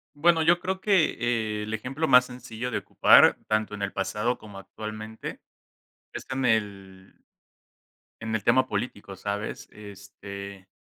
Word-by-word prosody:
Bueno, 165 +2 +3
yo 170 +2 +4
creo 190 +1 -3
que 120 - +1
el 110 +1 -5
ejemplo 135 +8 -2
más 125 0 +7
sencillo 125 -1 -7
de - - -1
ocupar, - - +5
tanto 110 -1 0
en 100 - -9
el 100 - -3
pasado 105 +5 -1
como 105 -2 -12
actualmente, 110 +2 -8 0.7
es - - -7
en 130 -1 -1
el 100 -4 -2 1.0
en 110 -1 -4
el 105 - -2
tema 130 +2 +3
político, 100 -2 -4
¿sabes? 100 +2 -5
Este, 100 -1 -10
110 Hz, 140 wpm, -26 LUFS, 100-125 Hz, 1.0 s, más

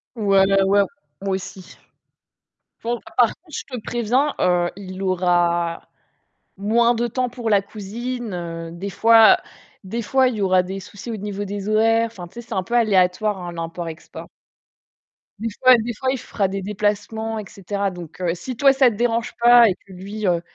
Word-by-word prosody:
Ouais, 200 -4 +3
ouais, 195 0 +3
ouais, 200 +1 +4 0.4
moi 195 -1 -1
aussi. 190 0 -9 1.1
Bon, 235 +1 -2 0.2
par 240 -2 +5
contre, 320 -3 -16
je - - -4
te 250 -3 -6
préviens, 245 +6 0
heu, 175 -1 +2
il 190 -1 -8
aura 175 -2 +1 0.7
moins 230 +4 +2
de 240 +1 0
temps 255 +2 -1
pour 240 -2 -4
la 200 -2 +4
cousine, 225 +3 -6
heu, 165 -1 -6
des 180 +4 -6
fois, 225 +3 +6
heu - - +1 0.5
des 225 +5 -4
fois, 260 +3 +3
il 245 - -4
y - - -4
aura 185 -1 +3
des 190 +2 -6
soucis, 205 +4 -9
au 225 - -3
niveau 205 0 -5
des 200 0 -5
horaires. 225 +1 +3
Enfin, 180 -6 -10
tu - - -26
sais, 235 - -7
c'est - - -10
un 190 - 0
peu 210 +6 -5
aléatoire, 205 -2 +2
hein, 175 0 -6
l'import-export. 165 0 -7 1.1
Des 230 +2 -2
fois 255 -1 +7
des 235 +1 -3
fois, 260 +5 -2
il 265 - -1
fera 205 -4 -2
des 195 +1 -4
déplacements, 210 +2 -2
et 215 - -5
cetera. 200 +1 -3
Donc 175 -2 -10
heu, 175 -2 0
si 245 +9 -6
toi, 275 +2 +5
ça 265 -2 +5
te 225 - -6
dérange 235 +1 -1
pas 240 -1 +7
et 185 - -1
que 195 - -17
lui, 200 +4 -6
heu, 175 -2 +2
205 Hz, 195 wpm, -21 LUFS, 185-235 Hz, 1.1 s, fois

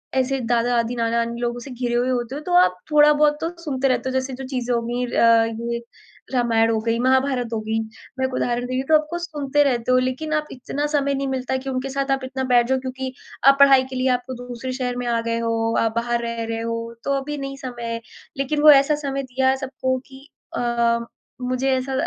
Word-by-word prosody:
ऐसे 265 +1 +1
दादा-दादी, 240 0 +1
नाना-नानी 235 0 -1
लोगों 240 0 -2
से 260 +2 -9
घिरे 245 -1 -3
हुए 245 +2 +1
होते 245 +1 -2
हो, 295 - -5
तो 355 +3 -4
आप 180 - +4 0.2
थोड़ा-बहुत 295 0 +5
तो 330 - -1
सुनते 270 -4 0
रहते 260 0 0
हो। - - -4
जैसे 260 0 -1
जो 265 +1 -6
चीज़ें 250 -2 -2
हो 235 - 0
गयी 245 +1 -1
अ, 230 -1 +4 0.3
ये 235 - -3 0.5
रामायण 230 -2 +3
हो 220 - +1
गई, 230 0 0
महाभारत 260 -1 +2
हो 220 - 0
गई। 220 +1 -1 0.4
मैं 260 - +2
एक 260 - -3
उदाहरण 245 0 -1
दे 255 - -5
रही 260 - 0
तो 315 - +7
आप 305 - +3
को 345 - -3
सुनते 295 -4 0
रहते 250 -3 0
हो। 255 - +5
लेकिन 255 +5 -2
आप 305 -1 0
इतना 280 +3 -4
समय 280 -2 +1
नहीं 275 0 -2
मिलता 260 0 -1
कि 270 +1 -6
उनके 260 +1 -2
साथ 275 0 -2
आप 270 -1 0
इतना 265 0 -4
बैठ 240 -1 +5
जाओ 265 0 +1
क्योंकि 260 0 -5 0.3
आप 275 0 +7
पढ़ाई 275 -2 +7
के 260 - -7
लिए 255 +1 0
आप 250 0 +2
तो 260 - -4
दूसरे 250 +1 -5
शहर 250 -1 -2
में 245 - -3
आ 235 -1 +1
गए 230 0 -1
हो, 230 0 0
आप 225 -1 +1
बाहर 235 0 0
रह 230 0 -3
रहे 225 0 -3
हो, 230 0 -4
तो 280 - 0
अभी 295 +1 -5
नहीं 275 0 -5
समय 250 -3 -7
है। 230 - -3 0.4
लेकिन 285 +2 -1
वो 305 0 +9
ऐसा 280 +2 +5
समय 275 -2 -3
दिया 260 +1 +1
है 265 - +2
सबको 260 -1 -2
कि 270 +1 -14 0.3
अ, 235 -1 +1 0.4
मुझे 255 +1 -1
ऐसा 265 +1 -3
255 Hz, 235 wpm, -22 LUFS, 235-275 Hz, 0.5 s, वो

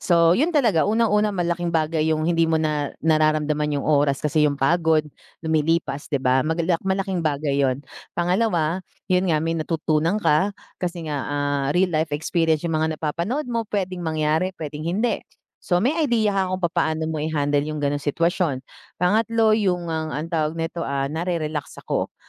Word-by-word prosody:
So 170 -1 +4
'yon 290 - +2
talaga. 225 - +3
Unang-una 215 -1 +2
malaking 175 0 -1
bagay 160 -1 0
yung 155 0 -2
hindi 165 -1 +2
mo 160 - +2
na 150 -2 -1
nararamdaman 155 -1 +2
yung 140 - -3
oras 145 -1 +2
kasi 150 0 +3
yung 140 - -2
pagod 160 +2 +2 0.4
lumilipas 160 -2 0
'di 145 - 0
ba? 130 +1 +3
Magalak 165 +3 0
malaking 190 -1 -1
bagay 145 -2 0
'yon. 135 +1 0 0.3
Pangalawa, 175 -2 +1 0.3
'yon 180 0 +2
nga, 155 - +3
may 165 - 0
natutunan 160 +3 0
ka 195 +1 +2 0.2
kasi 175 -2 -3
nga, 145 -3 -3
ah, 145 -1 -1
real 180 -1 +2
life 155 +1 +1
experience 160 0 0
yung 165 -2 -1
mga 160 0 0
napapanood 170 - -2
mo. 230 -2 -2
Pwedeng 185 -3 -2
mangyari, 160 +3 0
pwedeng 150 -1 -6
hindi. 220 +7 0 0.4
So 180 0 0
may 250 - +3 0.2
idea 225 -4 +2
ka 185 -1 0
kung 185 - -6
papaano 160 -2 0
mo 155 - -3
i-handle 145 -1 0
yung 155 -1 -4
ganong 145 0 +1
sitwasyon. 160 -1 0 0.3
Pangatlo, 220 +4 +2
yung 180 -5 0
ang 160 -1 -3
ang 155 +4 -4
tawag 155 -1 0
nito 165 +1 -3
ah, 140 0 -1
nare-relax 160 -3 -3
ako - - -2
160 Hz, 170 wpm, -23 LUFS, 150-180 Hz, 0.4 s, So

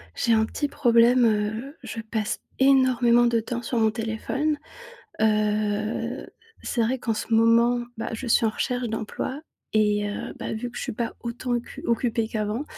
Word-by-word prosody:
J'ai 230 - +2
un 220 - +4
petit 290 +6 -2
problème, 240 -2 +4
heu, 220 +6 -1
je 225 - -5
passe 220 -1 -3 0.2
énormément 255 -3 +5
de 235 -1 +2
temps 235 +2 -4
sur 240 +1 -3
mon 220 -1 +3
téléphone. 230 +7 -2 0.6
Heu 215 +3 0 0.4
c'est 235 - -1
vrai 250 +4 0
qu'en 230 -2 -1
ce 220 - -5
moment, 235 +2 +4
bah, 225 - -4
je 225 +3 -5
suis 230 - +3
en - - +2
recherche 245 +2 -2
d'emploi 220 +5 -4 0.3
et 210 -1 +2
heu, 205 - -5
bah - - -4
vu 240 +2 -4
que 245 - -13
je - - -3
suis - - -3
pas 230 +1 -3
autant 245 +1 -4
occu 240 0 -4
occupée 230 -1 0
qu'avant, 215 +4 -2
230 Hz, 175 wpm, -25 LUFS, 220-245 Hz, 0.6 s, énormément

